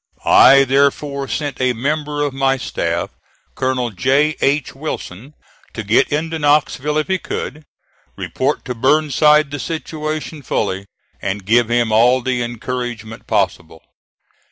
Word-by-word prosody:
I 135 +1 +7
therefore 140 +1 +1
sent 145 -3 -3
a 130 -1 +2
member 145 +4 -2
of 145 -2 -2
my 135 0 +1
staff, 85 -9 -3 0.4
Colonel 125 -2 -1
J. 135 +9 +1
H. 140 -1 +1
Wilson, 135 -3 -7 0.4
to 110 - -4
get 105 +3 +2
into 160 +2 -2
Knoxville 150 0 +1
if 155 - 0
he 190 -1 0
could 155 -1 -6 0.5
report - - -2
to 125 - -3
Burnside 150 +3 +3
the 145 - -4
situation 155 0 -5
fully, 100 -6 -2 0.3
and 100 0 -3
give 115 +2 +3
him 120 -1 +1
all 120 +4 +4
the 125 -1 -1
encouragement 120 -1 -5
possible. 80 0 -2
135 Hz, 130 wpm, -18 LUFS, 120-150 Hz, 0.5 s, I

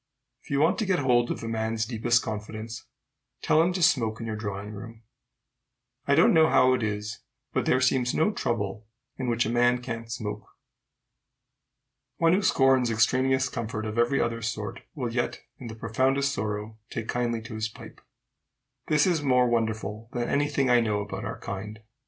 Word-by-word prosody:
If - - -19
you 140 - +1
want 165 +6 +3
to 215 - 0
get 185 -2 +2
hold 125 -4 +2
of - - -4
a - - -4
man's 110 0 -1
deepest 120 0 +1
confidence, 110 +1 -6 0.6
tell 155 - +4
him 175 +2 +2
to 180 -1 -1
smoke 115 -8 +2
in 115 - -5
your 110 -1 -3
drawing 105 -1 -5
room. 115 +2 -10 1.0
I - - +4
don't - - +5
know 160 0 +5
how 130 0 +5
it 125 - 0
is, 105 0 -3 0.3
but - - 0
there 130 - +4
seems 130 -1 +2
no 160 +7 +3
trouble 105 - -3 0.3
in 130 -2 -1
which 115 0 +1
a - - -1
man 120 +1 +3
can't 115 -2 -6
smoke. 105 -2 -5 1.7
One 165 0 +4
who 190 - +3
scorns 135 - +3
extraneous 130 +4 +2
comfort 110 -3 -4
of 110 +2 -3
every 120 +4 +2
other 115 0 -1
sort, 110 -2 -4 0.2
will 125 -5 -3
yet, 120 0 -2 0.2
in 125 - -8
the 110 - -7
profoundest 130 +5 +1
sorrow, 105 -1 -4
take 115 -1 -5
kindly 120 -2 -1
to 115 0 -9
his 110 0 -2
pipe. - - -13 0.9
This 150 -1 +3
is 175 -5 +1
more 125 -3 +3
wonderful 110 -1 -2
than 120 -1 -1
any 145 +1 +1
thing 140 -2 +1
I 125 -1 +5
know 105 -2 0
about 100 - -6
our - - -5
kind. 105 +2 -6
115 Hz, 185 wpm, -27 LUFS, 110-130 Hz, 1.7 s, don't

